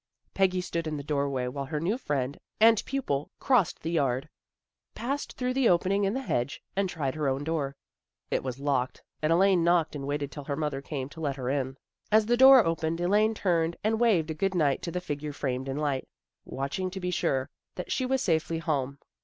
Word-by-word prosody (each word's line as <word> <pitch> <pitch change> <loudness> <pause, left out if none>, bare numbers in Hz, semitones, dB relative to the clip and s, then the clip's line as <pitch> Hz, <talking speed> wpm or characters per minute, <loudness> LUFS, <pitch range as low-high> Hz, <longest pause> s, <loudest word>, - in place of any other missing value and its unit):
Peggy 185 -1 +2
stood 170 -2 -3
in 155 -1 -2
the 140 - -5
doorway 140 -3 -1
while 140 +2 -4
her 150 +2 -3
new 180 +8 0
friend 140 - -2 0.2
and 225 0 +6
pupil 150 - -2
crossed 250 - +2
the 165 - -2
yard, 135 -3 0 0.7
passed 275 +4 -3
through 250 0 -2
the 265 -3 +3
opening 190 +3 +2
in 195 +4 0
the 270 - -2
hedge 125 - -1 0.2
and 195 -1 +1
tried 140 -7 -2
her 155 -2 -1
own 135 +1 0
door. 145 -3 -2 0.6
It - - 0
was 130 -1 -4
locked, 135 -3 -1 0.2
and 155 +1 +1
Elaine 185 0 +4
knocked 170 -2 +2
and 140 -1 -5
waited 145 0 -2
till 145 -2 -8
her 140 - -2
mother 150 -2 -2
came 140 -2 -4
to 160 +3 -10
let 140 -3 -1
her 130 -1 -2
in. 135 -1 -2 0.3
As 215 0 +5
the 240 +2 +3
door 265 -1 +8
opened 165 0 -1
Elaine 210 +5 +3
turned 170 -4 +1
and 220 +1 +1
waved 185 -10 +3
a - - -1
good 190 +4 -1
night 145 -5 +2
to 170 - -4
the 180 - -3
figure 150 -3 -4
framed 130 -1 -3
in 135 - -3
light, 145 -3 -1 0.4
watch 135 +5 -4
ing 185 0 -1
to 190 - -6
be 180 -1 -2
sure 135 -6 0 0.2
that 180 - -6
she 260 - 0
was 265 0 +1
safely 165 -1 +1
home. 140 -4 -1
160 Hz, 215 wpm, -28 LUFS, 140-190 Hz, 0.7 s, door